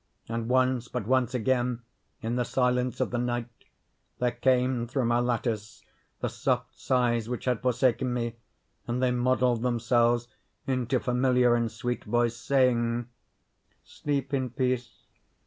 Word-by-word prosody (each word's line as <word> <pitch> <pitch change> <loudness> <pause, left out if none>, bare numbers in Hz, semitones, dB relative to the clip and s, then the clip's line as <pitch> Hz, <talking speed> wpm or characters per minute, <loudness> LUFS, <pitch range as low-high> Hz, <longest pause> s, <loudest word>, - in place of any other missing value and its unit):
And 115 0 -3
once—but 125 -2 +1
once 130 0 +1
again 125 0 0 0.4
in 115 +2 -1
the 125 - +1
silence 125 0 0
of - - 0
the 120 - -1
night; 120 -1 -1 0.7
there 125 -1 +1
came 125 0 +1
through 130 +1 -1
my 120 +1 +2
lattice 115 -3 -2 0.4
the - - 0
soft - - -1
sighs 120 -3 +1
which 125 - -4
had 125 -3 0
forsaken 125 0 +1
me; 120 -1 -2 0.5
and 120 +1 -1
they 125 - +3
modelled 125 -1 +2
themselves 120 0 +2 0.4
into 130 -1 0
familiar 125 0 +3
and 115 -1 +1
sweet 125 0 -3
voice, 120 -1 +1
saying: 120 -2 +1 0.7
"Sleep 140 -1 -3
in 130 -2 0
peace! 125 -1 -2
125 Hz, 135 wpm, -28 LUFS, 120-125 Hz, 0.7 s, they